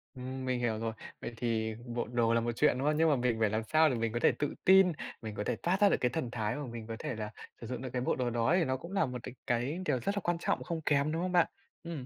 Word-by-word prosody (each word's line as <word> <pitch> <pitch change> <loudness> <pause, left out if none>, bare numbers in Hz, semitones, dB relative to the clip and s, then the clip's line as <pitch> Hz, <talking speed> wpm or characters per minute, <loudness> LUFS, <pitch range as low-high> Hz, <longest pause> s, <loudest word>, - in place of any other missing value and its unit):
Ừm, 130 +1 -5
mình 125 -1 0
hiểu 115 -3 0
rồi. 115 0 -2 0.3
Vậy 120 - -5
thì 110 -2 -1
bộ 120 -1 -3
đồ 115 -1 +2
là 115 - +3
một 120 +1 -1
chuyện, 150 -2 +3
đúng 135 +3 -1
không? 150 0 +2
Nhưng 160 0 +4
mà 145 - +4
mình 125 -3 +1
phải 110 -2 +3
làm 110 +1 -1
sao 155 +6 +4
để 130 - 0
mình 115 -1 -1
có 120 - 0
thể - - +5
tự 145 - -1
tin, 190 -1 +7 0.3
mình 110 -2 -6
có 105 - -2
thể - - -1
toát 185 +4 0
ra 205 - +7
được - - +3
cái 125 - +3
thần 130 -5 -2
thái 110 0 -1
mà 145 - -4
mình 115 -2 -7
có 115 - -4
thể - - -3
là 105 -1 -5 0.3
sử 115 - -6
dụng 125 0 -4
được 130 - -4
cái 125 - 0
bộ - - +1
đồ 125 -2 0
đó 120 +8 +2
thì - - +3
nó 130 -1 0
cũng 170 +7 -10
là 195 0 +2
một 125 -1 -4
đ - - -3 0.2
cái 125 +8 0
điều 130 -4 +1
rất 200 - -1
là 200 - 0
quan 175 -1 +1
trọng - - 0
không 165 -2 -3
kém, 145 0 +2
đúng 165 +2 -1
không 185 0 -1
bạn? 175 -2 +4 0.4
Ừm. 160 -7 -5
125 Hz, 320 wpm, -32 LUFS, 115-155 Hz, 0.4 s, tin